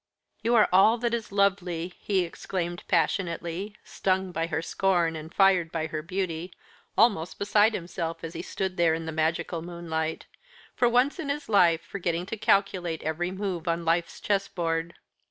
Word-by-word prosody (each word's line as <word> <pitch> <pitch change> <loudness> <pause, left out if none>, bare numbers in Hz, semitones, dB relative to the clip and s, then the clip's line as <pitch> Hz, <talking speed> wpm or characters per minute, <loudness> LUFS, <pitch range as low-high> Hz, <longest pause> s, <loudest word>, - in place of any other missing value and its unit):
"You 235 +1 +2
are 215 - +6
all 215 +5 +6
that 235 0 -1
is 230 -3 -3
lovely," 185 -3 0
he 195 -2 +1
exclaimed 175 0 -4
passionately, 175 +2 -1
stung 190 -1 -1
by 165 -1 -1
her 165 - -2
scorn 175 -3 +1
and 160 +1 -8
fired 185 -4 +4
by 160 -1 -2
her 155 -1 -4
beauty, 180 0 -3 0.5
almost 200 -8 +3
beside 210 +2 +3
himself 165 -2 -4
as 165 0 -5
they 170 - -4
stood 185 +1 -4
there 165 -2 +4
in 165 0 -5
the 160 - -3
magical 160 +1 -1
moonlight 160 -2 -4 0.5
for 245 - +3
once 250 +8 +2
in 300 -4 -4
his 290 +1 -3
life 175 -6 +4
forgetting 175 -2 -2
to 225 - -4
calculate 185 -5 +1
every 160 +3 -1
move 185 -3 -4
on 170 0 0
life's 170 +1 0
chessboard. 170 -4 -1
175 Hz, 165 wpm, -27 LUFS, 165-195 Hz, 0.5 s, are